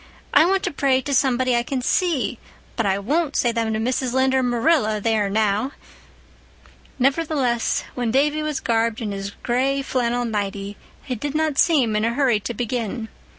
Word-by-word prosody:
"I 295 +3 +6
want 385 +2 +1
to - - -1
pray 270 -2 +2
to 280 +2 -3
somebody 255 -2 +2
I 235 - +2
can 255 +1 -3
see, 340 -1 0 0.4
but 225 -3 0
I 190 0 +1
won't 290 +9 -1
say 240 - +2
them 230 -1 -1
to 215 - -1
Mrs. 250 +2 -1
Lynde 260 0 +2
or 265 - +3
Marilla, 245 -2 +2
there 215 -1 +1
now!" 215 +5 0 1.2
Nevertheless, 270 -3 +1
when 245 -2 -2
Davy 295 +5 +2
was 305 -2 -2
garbed 230 -1 0
in 215 -2 -3
his 195 0 -4
gray 270 +3 0
flannel 245 -2 -1
nighty, 200 -2 -3 0.3
he 260 - -4
did 285 +5 -4
not 310 -2 0
seem 265 -10 +3
in 210 - +1
a 230 +1 0
hurry 250 -6 +2
to 240 - -5
begin. 230 -1 -3
245 Hz, 180 wpm, -22 LUFS, 220-275 Hz, 1.2 s, I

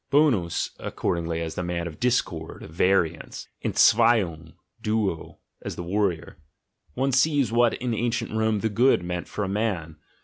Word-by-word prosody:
Bonus 130 - +2
accordingly 85 -1 -2
as 80 - -4
the - - -3
man 85 -1 -3
of 80 -3 -8
discord, 120 -10 -1
of 75 - -10
variance, 85 -1 0 0.2
"entzweiung" 100 -9 +3 0.3
(duo), 105 -6 -2 0.2
as - - -5
the 90 - -5
warrior: 90 -2 -1 0.6
one 135 +2 +1
sees 135 -2 +2
what 120 0 +3
in 125 -1 -3
ancient 115 +1 -1
Rome 110 -1 0
"the 110 - 0
good" 120 -1 +3
meant 90 0 -4
for 105 - -4
a - - -2
man. 95 -6 -2
105 Hz, 150 wpm, -25 LUFS, 85-120 Hz, 0.6 s, entzweiung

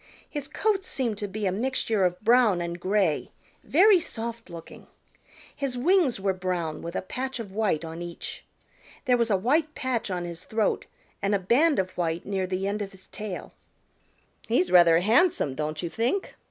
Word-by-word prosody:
His 290 -2 -5
coat 390 +6 0
seemed 235 - -1
to 205 - -3
be 205 +2 -4
a 190 - +2
mixture 220 -2 0
of 180 0 0
brown 230 -4 +4
and 170 0 -4
gray, 185 -4 +1 0.3
very 380 +4 +5
soft 230 - -6
looking. 170 -1 -11 0.7
His 275 -3 -3
wings 310 - +3
were 195 0 +1
brown 180 -4 -3
with 170 +2 -6
a - - -2
patch 260 +6 -4
of 210 -4 -6
white 190 -6 0
on 165 +1 -7
each. 175 -1 -7 0.6
There 250 -2 +4
was 235 -1 +1
a 200 - +3
white 300 - +1
patch 260 -7 -2
on 180 -2 -2
his 170 0 -7
throat 220 -1 -1 0.3
and 200 +1 +1
a - - +4
band 265 - +3
of 185 -1 0
white 170 -1 -2
near 190 -2 -1
the 185 +1 -2
end 205 +2 -1
of 200 0 -5
his 190 0 -15
tail. 210 -4 -6 0.9
"He's 185 -6 +2
rather 170 -2 +7
handsome, 225 - +3
don't 155 +3 -3
you 170 - -2
think?" 240 - -1
205 Hz, 180 wpm, -26 LUFS, 180-250 Hz, 0.9 s, rather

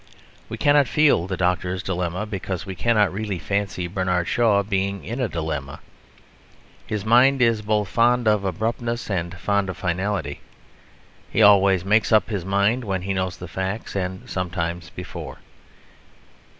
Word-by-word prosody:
We - - -5
cannot 145 -2 +4
feel 145 - +3
the 95 -1 -3
Doctor's 90 +1 -1
Dilemma, 90 +2 -2
because 95 -2 -5
we 95 - -5
cannot 105 -1 +2
really 105 -1 -3
fancy 100 -1 -2
Bernard 90 -1 -1
Shaw 110 -4 +3
being 100 0 -2
in 120 +4 -4
a 125 -4 0
dilemma. 80 -5 -4 1.1
His 105 -2 -3
mind 125 +4 +5
is 115 -3 +3
both 105 -1 0
fond 120 +3 +2
of 105 -2 +3
abruptness 115 +5 -2
and 90 -1 -3
fond 100 0 0
of 95 - -5
finality; 90 -4 -2 0.9
he 110 - +2
always 100 -3 +5
makes 105 +4 +2
up 110 +1 +3
his 100 -5 -2
mind 100 +6 +1
when 95 -4 -2
he 100 +1 -2
knows 95 -1 -2
the 90 - -8
facts 95 +6 -4
and 95 -1 -4
sometimes 85 -2 -3
before. - - -8
100 Hz, 150 wpm, -23 LUFS, 90-110 Hz, 1.1 s, mind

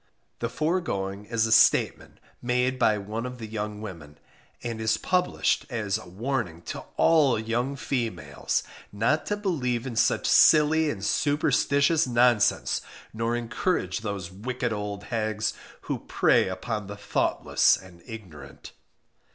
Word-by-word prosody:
The 115 - -2
foregoing 105 - -2
is 115 0 0
a 110 - -2
statement 110 - +3 0.2
made 125 +1 0
by 110 -3 +3
one 105 +3 -5
of 125 0 -8
the 115 - -7
young 105 -1 -5
women, 80 -9 -9 0.5
and 115 -2 -4
is 110 0 +1
published 180 +6 0
as 105 -4 -1
a 90 - -12
warning 100 -4 -3
to - - -8
ALL 150 -7 +4
young 120 +5 -2
females 120 -9 -2 0.3
not 115 +10 0
to 205 - -1
believe 130 - -1
in 125 -3 -5
such - - +2
silly 155 +1 +5
and 100 -8 -4
superstitious 145 +1 +2
nonsense, 120 -3 +2 0.3
nor 115 +2 -1
encourage 120 - -1
those 100 -4 -5
wicked 120 +4 -3
old 105 -1 -5
hags 110 -1 -2 0.3
who - - -3
prey - - +2
upon 100 +3 -4
the 100 0 -7
thoughtless 100 - +2
and 90 -2 -15
ignorant. 80 - -10
115 Hz, 135 wpm, -26 LUFS, 100-130 Hz, 0.5 s, silly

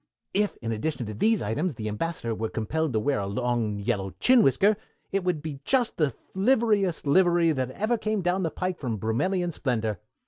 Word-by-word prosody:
If 205 +1 +1
in 115 - -2
addition 120 +3 -2
to 110 - -5
these 215 - +2
items 145 - -1
the 110 -1 -5
Ambassador 115 +2 -2
were 110 0 -3
compelled 150 +8 -1
to 110 - +2
wear 140 0 0
a 100 - -2
long, 120 -1 -1
yellow 100 -1 -2
chin 255 -1 +6
whisker, 195 - +4 0.4
it 195 -1 0
would 175 -5 -1
be 150 -4 -5
just 250 - +1
the 145 -7 +1 0.2
liverest 205 -5 +2
livery 170 +2 +4
that 130 -4 -1
ever 215 - -1
came 215 -3 -1
down 180 +2 +1
the 165 - 0
pike 185 0 -3
of 115 -6 -2
Brummelian 175 - 0
splendor. 110 -8 -1
155 Hz, 195 wpm, -26 LUFS, 115-190 Hz, 0.4 s, chin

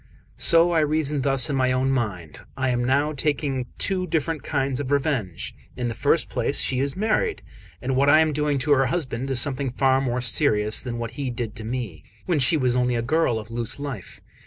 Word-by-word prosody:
So 170 +1 +5
I 165 - +3
reasoned 150 -2 +1
thus 135 -2 +3
in 145 - -2
my 130 -1 +2
own 130 +1 +1
mind: 100 - -3 0.2
"I 130 -1 0
am 120 -1 0
now 140 +4 +1
taking 140 -3 -1
two 185 -2 -1
different 160 -2 -1
kinds 135 -3 -2
of 140 -2 -4
revenge. 135 - -1 0.2
In 120 -1 -2
the - - -3
first - - +1
place, - - 0
she 130 - 0
is 140 +1 0
married; 225 - 0 0.4
and 130 +1 -1
what 140 +2 +3
I 155 +2 +7
am 155 -1 +1
doing 150 -1 0
to 150 - 0
her 135 -2 +4
husband 135 -6 -3
is 130 -2 +1
something 135 +1 -1
far 130 +1 +2
more 125 -2 -1
serious 110 -3 +1
than 120 -3 -5
what 115 -1 -4
he 135 - -2
did 120 -3 -5
to 110 - -6
me, 110 -10 -5 0.2
when 170 -5 +1
she 140 +5 +4
was 125 -3 +1
only 125 -1 +1
a 115 - -1
girl 140 -2 +1
of 110 +1 -8
loose 115 +2 -3
life. 135 -9 -7
135 Hz, 215 wpm, -24 LUFS, 120-145 Hz, 0.4 s, I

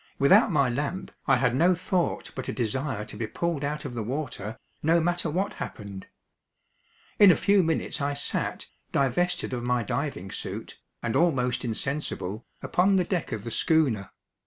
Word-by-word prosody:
Without 195 - +6
my 140 -5 +3
lamp 145 +9 -3 0.2
I 135 - +6
had 125 -1 +2
no 175 +6 +4
thought 180 0 -1
but - - -5
a - - -2
desire 120 -1 -2
to - - -8
be 115 - -3
pulled 170 +4 -2
out 150 +1 -2
of 130 - -5
the 120 - -3
water, 115 -3 -4 0.2
no 165 +3 +4
matter 175 0 0
what 190 +6 -1
happened. 100 -3 -7 1.1
In 205 - +9
a - - +4
few 200 -1 +4
minutes 165 -2 -1
I 140 0 0
sat, 140 - -1 0.3
divested 170 +4 +1
of 125 - -2
my 120 0 +1
diving 115 -6 -3
suit, - - -6 0.2
and 115 -2 -1
almost 130 -8 +2
insensible, 115 -4 -3 0.2
upon 190 +2 +3
the 185 - +4
deck 175 -2 -2
of 110 -3 -3
the 115 - -5
schooner. 135 - +2
140 Hz, 170 wpm, -27 LUFS, 120-170 Hz, 1.1 s, In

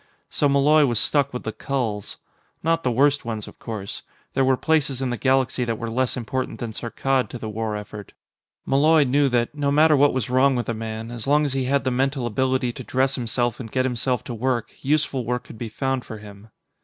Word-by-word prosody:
So 145 - +2
Malloy 145 +2 +5
was 120 -2 0
stuck 140 +4 +1
with 125 - -5
the 110 - -3
culls. 110 -3 -3 0.5
Not 165 +1 +2
the 125 - +1
worst 140 +4 +3
ones, 110 -2 -4
of - - -13
course; 105 -4 -6 0.3
there 135 - +2
were 130 0 +3
places 150 -4 +1
in 130 -2 -1
the - - -1
galaxy 130 0 +1
that 115 -2 -2
were 115 0 -4
less 130 +2 0
important 130 +2 -3
than 120 -3 -4
Saarkkad 130 +3 -1
to - - -6
the 115 - -6
war 110 0 -3
effort. 105 -1 -8 0.5
Malloy 150 +3 +4
knew 140 +1 +2
that, 120 0 0
no 145 -1 0
matter 155 +1 +5
what 145 +1 +5
was 130 -5 -1
wrong 130 +2 +3
with 120 -1 -2
a - - +1
man, 110 +1 -5
as 120 +1 -6
long 150 +1 +4
as 140 - -1
he 135 -1 0
had 140 +2 +1
the 130 - 0
mental 135 0 0
ability 130 +1 0
to - - -8
dress 130 +1 +1
himself 120 -2 -1
and 115 -4 -7
get 130 0 +1
himself 125 -1 -1
to 120 - -6
work, 120 0 -1
useful 140 -2 0
work 125 +1 -2
could 110 - -12
be 115 - -4
found 130 +2 -2
for 110 - -8
him. 105 0 -13
130 Hz, 225 wpm, -23 LUFS, 115-135 Hz, 0.5 s, Malloy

